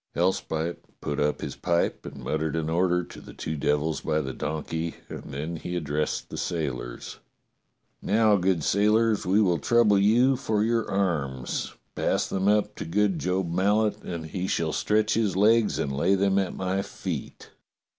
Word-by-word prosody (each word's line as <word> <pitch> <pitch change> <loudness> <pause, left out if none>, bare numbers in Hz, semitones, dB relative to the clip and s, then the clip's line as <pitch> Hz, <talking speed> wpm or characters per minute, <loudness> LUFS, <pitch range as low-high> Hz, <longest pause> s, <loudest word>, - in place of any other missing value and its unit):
Hellspite 85 -2 0 0.2
put 75 0 -3
up 75 0 0
his - - -5
pipe 85 -1 0
and - - -9
muttered 80 0 -1
an 80 -1 -1
order 90 +1 +2
to - - -11
the - - -12
two 80 - -4
devils 75 +2 0
by 80 -1 0
the 65 -3 -4
donkey, 80 +2 -3
and - - -7
then 75 +5 -5
he 90 +2 -5
addressed 75 -2 -2
the - - -5
sailors: 70 -8 -4 0.8
"Now, 110 0 +3
good 90 -4 +1
sailors, 105 +3 +2
we 95 +3 +4
will 90 -6 +3
trouble 105 +3 +4
you 120 +6 +4
for 105 -3 0
your 115 0 0
arms. 75 -10 -1 0.2
Pass - - 0
them 95 +1 -1
up 105 0 +2
to - - -5
good 95 +2 +1
Job 90 -1 -1
Mallet 105 +4 +2
and 85 -2 -5
he 90 +4 -3
shall 80 -4 0
stretch 105 0 +1
his 105 -5 +1
legs 110 +2 +4
and 70 -1 -2
lay 85 +8 +3
them 100 0 +2
at 95 - -2
my 95 +1 -1
feet." - - -6
90 Hz, 170 wpm, -26 LUFS, 80-105 Hz, 0.8 s, we